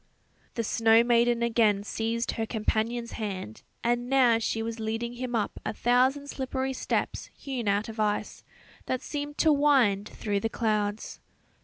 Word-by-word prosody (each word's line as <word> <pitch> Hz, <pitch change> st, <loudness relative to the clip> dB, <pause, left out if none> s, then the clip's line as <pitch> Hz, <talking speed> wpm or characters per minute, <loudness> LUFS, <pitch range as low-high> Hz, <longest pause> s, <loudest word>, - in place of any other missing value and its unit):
The 230 Hz, -, -1 dB
snow 225 Hz, +1 st, +4 dB
maiden 235 Hz, 0 st, +3 dB
again 225 Hz, -4 st, +2 dB
seized 230 Hz, +2 st, -2 dB
her 225 Hz, -1 st, -3 dB
companion's 230 Hz, +2 st, -1 dB
hand, 190 Hz, -, -5 dB, 0.2 s
and 240 Hz, +1 st, 0 dB
now 250 Hz, -4 st, +4 dB
she 225 Hz, 0 st, -1 dB
was 230 Hz, 0 st, -4 dB
leading 225 Hz, +2 st, -3 dB
him 245 Hz, 0 st, -4 dB
up 210 Hz, -3 st, -2 dB
a -, -, -3 dB
thousand 255 Hz, +5 st, +2 dB
slippery 265 Hz, -1 st, -3 dB
steps, -, -, -2 dB
hewn 255 Hz, -5 st, -4 dB
out 200 Hz, +2 st, +1 dB
of 225 Hz, 0 st, -8 dB
ice, 210 Hz, -1 st, -1 dB, 0.4 s
that 255 Hz, -, -2 dB
seemed 290 Hz, 0 st, -5 dB
to 315 Hz, -2 st, +4 dB
wind 255 Hz, -9 st, +3 dB
through 205 Hz, -2 st, -2 dB
the 225 Hz, -, -1 dB
clouds. 215 Hz, -2 st, -1 dB
230 Hz, 155 wpm, -28 LUFS, 220-250 Hz, 0.4 s, snow